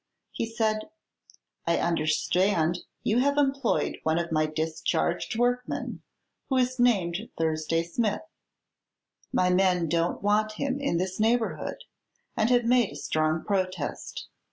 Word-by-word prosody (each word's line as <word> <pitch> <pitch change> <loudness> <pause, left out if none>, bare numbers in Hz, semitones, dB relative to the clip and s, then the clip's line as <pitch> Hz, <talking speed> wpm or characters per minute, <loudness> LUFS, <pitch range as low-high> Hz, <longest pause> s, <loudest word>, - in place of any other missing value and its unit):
He 230 - -3
said: 220 +1 -1 0.8
"I 170 - +3
understand 170 +2 +1 0.2
you 220 +3 +2
have 285 +2 +2
employed 275 -1 +1
one 160 +1 +1
of 170 -1 -2
my 155 -1 +2
discharged 160 +5 -1
workmen, 245 +1 -1 0.5
who 265 - +2
is 255 0 +1
named 205 -4 +2
Thursday 160 0 0
Smith. 205 - -1 1.1
My 180 0 +2
men 180 -2 +3
don't 170 +4 0
want 215 +1 +2
him 275 +4 -2
in 275 -11 0
this 185 +2 -2
neighborhood, 225 +1 0 0.5
and 220 +1 +2
have 245 -1 +3
made 240 -3 +3
a - - -10
strong 155 +1 0
protest. 185 -6 -3
190 Hz, 130 wpm, -27 LUFS, 165-235 Hz, 1.1 s, I